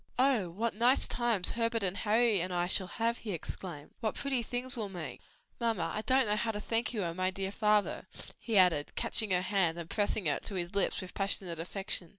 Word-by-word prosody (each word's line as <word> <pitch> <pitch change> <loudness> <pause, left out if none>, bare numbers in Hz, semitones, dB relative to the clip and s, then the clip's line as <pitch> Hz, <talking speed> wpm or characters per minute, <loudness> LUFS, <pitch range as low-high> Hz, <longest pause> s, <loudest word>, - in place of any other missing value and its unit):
"Oh 250 -8 +3
what 220 +7 -2
nice 240 +5 +3
times 235 -6 0
Herbert 230 -1 0
and 190 0 +2
Harry 215 -1 +3
and 180 +1 -2
I 175 -1 +1
shall 185 +1 +2
have!" 230 +4 -1
he 210 -4 -4
exclaimed. 165 -2 -7
"What 220 -3 -1
pretty 270 -3 0
things 245 +3 -3
we'll 215 -4 -3
make! 165 -9 -7 0.4
Mamma, 225 -7 0
I 215 - -2
don't 260 +2 +3
know 210 -1 +2
how 225 +2 -1
to 210 -2 -2
thank 225 +2 -1
you 215 -5 -2
and 170 -1 -3
my 185 +1 +1
dear 190 +1 -3
father!" 210 0 +1 0.3
he 225 -3 0
added, 175 -6 +4
catching 220 - 0
her 180 -1 +2
hand 180 -4 +1
and 170 -1 -6
pressing 205 -2 0
it 145 -2 0
to 200 - -4
his 175 -1 -3
lips 200 - +2
with 185 - -9
passionate 190 -4 -1
affection. 185 0 -1
205 Hz, 215 wpm, -32 LUFS, 180-230 Hz, 0.4 s, added